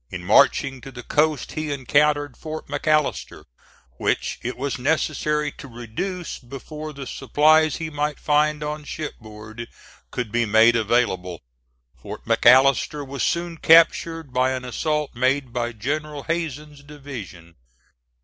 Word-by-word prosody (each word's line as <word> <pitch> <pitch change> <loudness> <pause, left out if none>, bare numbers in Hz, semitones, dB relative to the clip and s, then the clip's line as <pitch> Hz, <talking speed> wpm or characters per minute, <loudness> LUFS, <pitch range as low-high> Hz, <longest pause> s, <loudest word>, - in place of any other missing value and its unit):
In 90 -1 -7
marching 130 +7 +3
to 135 - -10
the 120 -2 -9
coast 150 0 0
he 155 -1 -4
encountered 145 0 +1
Fort 155 0 -7
McAllister, 150 - -1 0.5
which - - -1
it 125 +2 -4
was 135 0 -3
necessary 150 +1 0
to 140 - -12
reduce 125 - -5
before 150 +5 -8
the 140 -2 -8
supplies 155 +3 +3
he 160 -1 -5
might 150 0 -2
find 150 0 +1
on 150 0 -4
shipboard 110 -6 -8 0.4
could 120 -4 -4
be 120 0 +1
made 110 +3 +5
available. 100 - 0 0.5
Fort - - -10
McAllister 135 +2 +4
was 140 +1 -5
soon 170 -1 -1
captured 165 -2 +4
by 130 +1 +2
an 130 -1 -5
assault 150 +4 -2
made 130 +1 0
by 120 -1 -2
General 145 +6 -4
Hazen's 150 -3 -4
division. 125 - -10
140 Hz, 130 wpm, -23 LUFS, 120-150 Hz, 0.5 s, made